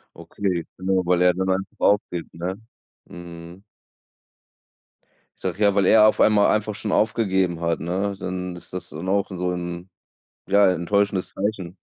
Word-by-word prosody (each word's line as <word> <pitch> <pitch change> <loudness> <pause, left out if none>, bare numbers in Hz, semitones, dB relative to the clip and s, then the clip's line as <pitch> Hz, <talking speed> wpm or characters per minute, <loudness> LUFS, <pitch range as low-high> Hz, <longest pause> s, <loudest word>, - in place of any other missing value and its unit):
Okay, 90 -5 -3
genau, 95 0 0
weil 90 0 +2
er 90 0 +5
dann 95 +1 -2
einfach 95 +1 -2
aufgibt, 90 -4 0
ne? 90 +3 -4 0.5
Mm. 85 +1 -11 1.8
Ich - - -12
sage 105 - -3
ja, 100 -1 +5
weil 100 -2 +3
er 110 +1 +7
auf - - 0
einmal 105 -1 +5
einfach 110 -1 -1
schon 105 0 -4
aufgegeben 95 -6 +1
hat, 85 -1 0
ne? 95 +4 -2
Dann 90 -1 -5
ist 85 - -8
das 90 - -5
dann 80 +5 -7
auch 100 +1 +1
so 90 -1 -2
'n, 90 +1 -5 0.6
ja, 100 -1 +5
enttäuschendes 95 +2 0
Zeichen. 95 -3 -4
95 Hz, 155 wpm, -23 LUFS, 90-100 Hz, 1.8 s, er